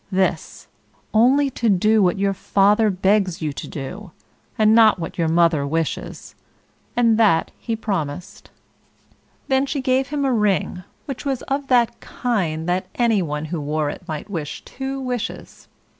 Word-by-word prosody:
This 185 -4 -1 0.5
only 265 +5 +4
to 235 -2 0
do 215 +3 +3
what 180 -1 +2
your 195 0 +1
father 205 +3 +3
begs 190 -1 +1
you 155 -3 -3
to - - -7
do, 180 +8 -7 0.5
and 215 0 +4
not 220 -2 +6
what 170 0 -6
mother 165 -3 +2
wishes;" 160 +1 -3 0.6
and 230 -2 +3
that 195 -8 +3
he 230 - -3
promised. 180 -8 -4 1.0
Then 265 +1 +2
she 280 +1 -2
gave 260 0 +1
him 285 -1 -2
a 265 - +2
ring, 200 -4 0 0.2
which 275 -3 -6
was 270 -3 -2
of 275 0 -3
that 245 -3 +2
kind 175 -10 -2
that 180 +1 -1
any 230 -4 +2
one 150 -2 -3
who 165 - -2
wore 150 0 -1
it - - -9
might 155 -3 -5
wish 165 -8 -6
two 270 +1 -5
wishes. 250 -3 -5
205 Hz, 155 wpm, -21 LUFS, 165-240 Hz, 1.0 s, not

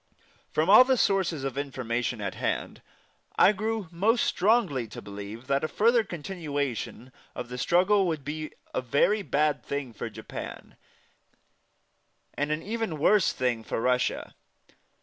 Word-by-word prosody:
From 155 +2 0
all 210 +6 +9
the 260 0 +2
sources 185 - +1
of 135 0 -3
information 125 -4 -2
at 100 -2 -3
hand, - - -3 0.6
I - - +7
grew 215 -1 -2
most 215 +7 +2
strongly 180 - +2
to - - -9
believe 100 +4 -8
that 140 +1 0
a - - +1
further 230 +6 +3
continuation 145 - -4 0.2
of 120 - -6
the 125 - -6
struggle 185 +5 +3
would 155 -5 -3
be 155 +1 -4 0.2
a - - 0
very 145 - +2
bad 150 -4 0
thing 140 -4 -4
for - - -5
Japan, - - -8 1.6
and 145 +1 -2
an 155 +1 -1
even 220 -6 -3
worse 195 +6 +4
thing 125 -3 -1
for - - -3
Russia. 125 +2 0
150 Hz, 145 wpm, -27 LUFS, 125-195 Hz, 1.6 s, all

